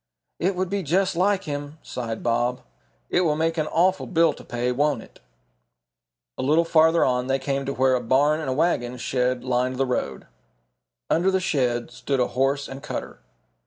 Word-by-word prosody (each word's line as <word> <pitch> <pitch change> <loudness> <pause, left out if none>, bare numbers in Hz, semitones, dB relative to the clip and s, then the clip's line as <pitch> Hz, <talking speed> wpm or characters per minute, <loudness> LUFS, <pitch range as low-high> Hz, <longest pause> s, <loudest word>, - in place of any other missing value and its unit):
"It 185 +3 +1
would 185 0 -2
be 200 0 0
just 185 +3 +1
like 195 +2 +2
him," 145 0 -5
sighed 115 -3 -5
Bob. 120 +2 0 0.5
"It - - +3
will 155 -4 +2
make 165 +1 0
an 155 - 0
awful 185 +4 +1
bill 165 -3 +3
to - - -13
pay, 120 +1 -2
won't 140 -2 0
it?" - - -19 1.2
A - - 0
little 155 +5 +3
further 160 0 +4
on 125 -1 0
they 135 0 +2
came 135 0 -2
to 140 - -1
where 130 0 +3
a 125 - +1
barn 140 +6 +2
and 155 - -3
a - - +1
wagon 130 -5 0
shed 125 0 -1
lined 125 0 0
the 135 +1 +1
road. 125 -1 -3 0.9
Under 175 +4 +3
the 190 0 +2
shed 125 -8 0
stood 135 -2 -2
a 125 - +1
horse 135 +2 0
and 135 +1 -8
cutter. 150 - -6
140 Hz, 190 wpm, -24 LUFS, 125-165 Hz, 1.2 s, further